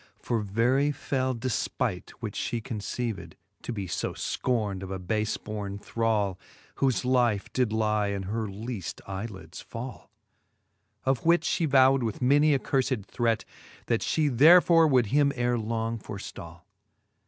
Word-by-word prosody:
For 115 - -1
very 120 +8 +2
fell 130 -3 -1
defpight, 120 +1 -2
which - - -4
fhe 115 -2 -2
conceived. 105 -6 -4 0.3
To - - -5
be 100 -4 -4
fb 85 - -3 0.3
fcorned 105 -6 0
of 95 - -6
a 95 - -3
bafe 105 +4 -2
born 105 -2 -5
thrall, 105 -3 -1 0.4
Whofe 130 -2 +1
life 120 -5 +1
did 125 -4 +1
lie 110 -1 +1
in 100 -1 -2
her 110 +3 -2
leafl 105 -1 -6
eye 95 +3 -4
lids 95 -6 -10
fall; 125 +3 -8 1.0
Of 130 -2 +1
which 170 +1 +3
fhe 165 - +1
vowd 135 0 +5
with 110 -3 -2
many 145 +3 +4
a - - +4
curfed 130 -6 -1
threat, 115 -1 0 0.4
That 115 - 0
fhe 150 -5 +1
therefore 165 +3 +7
would 130 -5 +4
him 140 -1 +4
ere 120 -1 +1
long 115 +1 -2
forftall. 90 -5 -9
115 Hz, 150 wpm, -27 LUFS, 100-130 Hz, 1.0 s, therefore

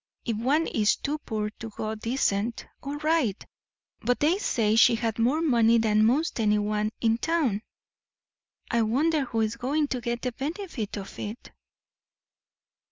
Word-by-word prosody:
If 230 - -1
one 280 +8 +2
is 215 -7 +2
too 300 +2 -3
poor 215 -6 -3
to 225 - -6
go 215 +1 -4
decent, 225 -1 -1 0.2
all 280 +1 -5
right; 305 - 0 0.6
but 245 +2 0
they 330 +6 +2
say 220 - +1
she 230 +1 +6
had 225 0 -2
more 270 +8 +2
money 235 -6 +4
than 215 -1 +3
most 280 +4 +1
anyone 210 0 +1
in 225 0 +2
town. 290 -11 0 1.1
I 235 - +2
wonder 280 +7 +1
who 230 -2 -1
is 220 +1 -1
going 285 +4 0
to 250 - -2
get 235 0 -3
the 250 - -1
benefit 280 - -5
of 195 -1 -8
it?" 215 +3 -7
235 Hz, 155 wpm, -27 LUFS, 215-285 Hz, 1.1 s, she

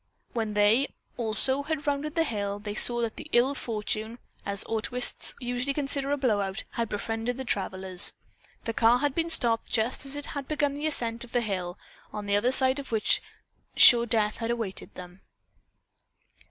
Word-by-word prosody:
When 220 -3 -3
they, 210 +6 +3 0.3
also, 245 +4 +5
had 305 0 -4
rounded 290 +2 -2
the 330 - +2
hill, 205 -7 -3
they 205 0 -7
saw 240 +2 +5
that 230 -2 -4
"ill 245 +4 +3
fortune," 220 -2 -4 0.3
as 200 -1 0
autoists 240 +3 -1
usually 250 +2 -3
consider 275 -1 -1
a 290 - 0
blow 235 -7 0
out, 195 +1 -5
had 230 -2 -3
befriended 225 +3 -4
the 265 - -6
travelers. 190 -4 +1 0.5
The 230 - -3
car 230 +2 +3
had 285 +1 -1
been 335 +2 -1
stopped 235 -8 +3
just 230 +5 0
as 275 - +3
it 290 0 -5
had 280 -2 -6
begun 295 -2 -1
the 295 +2 -3
ascent 235 -6 -1
of 240 - -14
the 245 - +1
hill, 185 -4 -4 0.3
on 210 -1 -7
the 200 0 0
other 235 +5 +1
side 260 +1 +3
of 275 - -9
which 220 -2 +1 0.5
sure 240 -1 +7
death 215 -2 0
had 230 -1 -4
awaited 225 -5 -5
them. 180 +1 -12
235 Hz, 180 wpm, -26 LUFS, 210-270 Hz, 0.5 s, sure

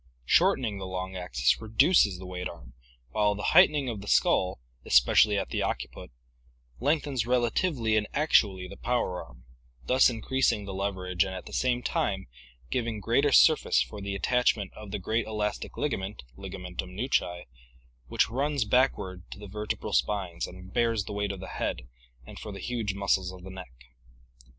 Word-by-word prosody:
Shortening 110 - +2
the 95 - -5
long 95 0 -5
axis 65 -9 +1
reduces 110 - +3
the 95 - -9
weight 90 0 -5
arm, - - -12 0.4
while 105 -1 +2
the 105 - -6
height 180 +4 +8
ening 145 -3 -2
of 110 -5 -4
the 100 - -10
skull, 90 -7 +2 0.2
especially 105 -1 +5
at 100 - -2
the - - -2
occiput, - - -4 0.7
lengthens 140 -3 0
relatively 120 0 +1
and 105 -1 +1
actually 100 -11 +2
the - - -11
power 120 -7 -1
arm, - - -17 0.4
thus 130 +1 +5
increasing 120 -2 0
the 100 - -6
leverage 95 -2 -1
and 95 -1 -5
at 95 - -7
the - - -11
same 125 -1 0
time 95 -4 -1 0.5
giving 115 -3 -1
greater 120 +8 +2
surface 155 +3 +5
for 105 - -9
the 100 0 -4
attachment 110 -2 +1
of 105 -1 -10
the 105 - -3
great 110 +4 -1
elastic 105 -1 -3
ligament 100 - -3
(ligamentum 90 +3 -7
nuchae) 90 -7 -1 0.6
which - - +2
runs 140 +1 -1
backward 105 -6 +1
to - - -9
the 105 0 -9
vertebral 105 +2 -4
spines 95 -5 0
and 95 +1 -12
bears 115 -3 +1
the 100 - -7
weight 100 0 -1
of 100 - -7
the 95 - -7
head, 65 - -4 0.4
and - - -10
for 105 - -7
the 100 - -8
huge 115 -5 -3
muscles 95 -2 0
of 90 -1 -12
the 95 - -9
neck. 95 -8 -9
105 Hz, 170 wpm, -28 LUFS, 95-120 Hz, 0.7 s, height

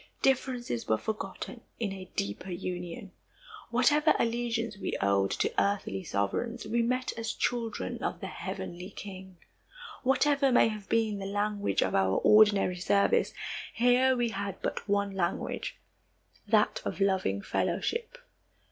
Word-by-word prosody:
Differences 250 - 0
were 110 - +3
forgotten 215 - -5 0.2
in 210 -4 -1
a 185 -1 -9
deeper 100 - -3
union. 180 +3 -5 0.6
Whatever 290 +6 +4
allegiance 230 -1 -1
we 200 - -3
owed 100 0 +2
to - - 0
earthly 195 - -1
sovereigns, 225 - -2
we 235 +2 +1
met 255 +2 0
as 225 - -2
children 230 -3 -2
of - - -2
the - - -6
heavenly 180 +2 -6
King. 190 -2 -9 0.6
Whatever 275 +1 +3
may 245 - +5
have 215 -2 -7
been 220 -3 +1
the 195 - -4
language 205 0 0
of - - -1
our 95 0 +3
ordinary 205 -4 +5
service, 200 - +2 0.4
here 250 +2 +4
we 240 -1 +1
had 200 -2 -4
but - - -3
one 200 0 +1
language 180 -3 -2 0.7
that - - +3
of - - -4
loving 190 - +1
fellowship. 470 +1 -1
205 Hz, 135 wpm, -30 LUFS, 190-240 Hz, 0.7 s, may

